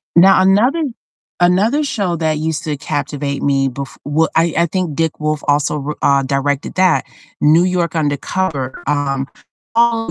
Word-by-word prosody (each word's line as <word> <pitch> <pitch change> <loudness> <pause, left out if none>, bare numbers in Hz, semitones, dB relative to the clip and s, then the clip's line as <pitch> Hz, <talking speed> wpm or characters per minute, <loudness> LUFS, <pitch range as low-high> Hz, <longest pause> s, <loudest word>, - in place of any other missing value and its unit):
Now 185 +2 +6
another 235 - +3 0.6
another 205 +12 +3
show 200 -10 -1
that 155 -1 0
used 160 0 -2
to 150 -2 -2
captivate 140 -1 -3
me 135 -1 +1
bef 135 +1 -7
well, 155 +2 +1
I 165 0 +2
I 170 - +4
think 175 -4 -2
Dick 165 -2 -1
Wolf 155 -1 -2
also 145 +1 +1
wr 150 +2 -4
uh, 140 -1 +4
directed 140 +1 -2
that, 185 -2 +3 0.4
New 160 +4 +5
York 180 -2 -1
Undercover. 145 -1 -2
Um, 140 -2 -1 0.5
all 230 -1 +2
155 Hz, 155 wpm, -17 LUFS, 145-185 Hz, 0.6 s, Now